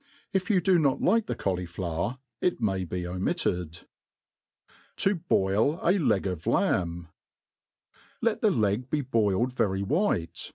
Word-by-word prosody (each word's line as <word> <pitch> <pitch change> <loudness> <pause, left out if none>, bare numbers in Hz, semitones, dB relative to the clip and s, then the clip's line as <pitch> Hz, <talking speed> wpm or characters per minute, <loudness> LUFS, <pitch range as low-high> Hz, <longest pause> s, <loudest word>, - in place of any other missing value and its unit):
If 190 +2 0
you 190 -4 +3
do 180 0 +4
not 140 -4 +2
like 225 +3 +2
the - - -2
cauli* 90 -2 -2
flower, 85 +6 -3 0.2
it 180 - +1
may 95 -5 0
be 90 +1 -4
omitted. 90 -1 -2 1.2
To 195 -2 +1
hoil 105 - +2
a 185 +4 +3
Leg 105 - +1
of 90 -4 -4
Lamb* 85 -2 0 1.1
LET - - 0
the - - +4
leg 110 +4 0
be 150 +1 0
boiled 115 -2 +1
very 95 -5 0
white. 140 - -1
105 Hz, 140 wpm, -27 LUFS, 90-150 Hz, 1.2 s, do